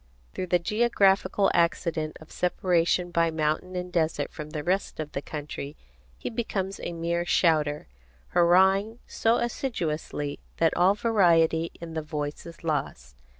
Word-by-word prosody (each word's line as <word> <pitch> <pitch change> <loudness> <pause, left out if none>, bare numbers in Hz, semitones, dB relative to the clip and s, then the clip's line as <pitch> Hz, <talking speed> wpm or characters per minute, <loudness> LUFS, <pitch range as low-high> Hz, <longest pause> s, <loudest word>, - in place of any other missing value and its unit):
Through 185 - -4
the 180 - +3
geographical 200 -1 +2
accident 170 -2 0
of 155 - -15
separation 175 0 +1
by 170 -1 +2
mountain 160 +3 -1
and 180 0 -4
desert 160 -2 0
from 150 0 -7
the 150 -1 -5
rest 185 +1 -1
of 150 -1 -4
the 140 - -3
country, 145 -1 -7 0.4
he - - -5
becomes 195 -5 -3
a - - -4
mere 170 +1 -1
shouter, 155 -4 +2 0.4
hurrahing 190 +5 +4
so 225 +1 +1
assiduously 165 - -3 0.2
that 165 -1 +2
all 185 +3 +4
variety 170 -7 +3
in 170 -1 -8
the 160 - -2
voice 150 0 -5
is 170 - -12
lost. 100 - -3
170 Hz, 145 wpm, -27 LUFS, 155-190 Hz, 0.4 s, hurrahing